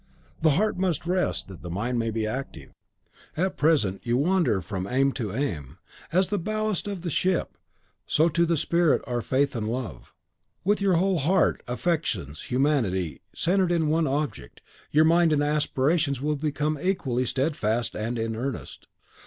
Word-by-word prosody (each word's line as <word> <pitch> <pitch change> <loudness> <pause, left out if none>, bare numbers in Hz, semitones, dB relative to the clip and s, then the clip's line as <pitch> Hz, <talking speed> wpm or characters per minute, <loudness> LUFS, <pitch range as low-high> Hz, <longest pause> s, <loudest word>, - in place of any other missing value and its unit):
The 155 -2 +4
heart 215 -1 +1
must 180 -5 0
rest, 180 +1 0
that 95 -3 -11
the 85 - -7
mind 115 +8 -1
may 115 0 0
be 110 0 -1
active. 130 +6 -5 0.7
At 185 +3 0
present 140 - +2
you 120 0 +1
wander 170 - +2
from 95 +1 -4
aim 135 +4 +2
to 115 -7 -4
aim. 85 - -3 0.3
As 185 +2 +2
the 205 - 0
ballast 215 +2 -1
to 205 -1 -3
the 175 -2 -5
ship, 185 +4 0 0.5
so 160 +2 +3
to 170 +1 +2
the 170 -1 +2
spirit 170 +1 +2
are 120 -1 -2
faith 135 +3 +1
and 110 -2 -2
love. 115 - -5 0.5
With 205 +2 +2
your 195 -3 +3
whole 185 +1 +2
heart, 180 +7 +2
affections, 125 - -2
humanity, 120 - 0
centred 180 +1 +2
in 165 -3 +2
one 160 0 +2
object, 140 - -3 0.3
your 155 +2 +5
mind 165 0 +4
and 145 -1 +2
aspirations 145 -1 +1
will 150 +2 0
become 150 0 -1
equally 130 -10 0
steadfast 120 -5 0
and 115 +3 -2
in 115 0 -2
earnest. 125 +2 -5
145 Hz, 165 wpm, -26 LUFS, 120-170 Hz, 0.7 s, your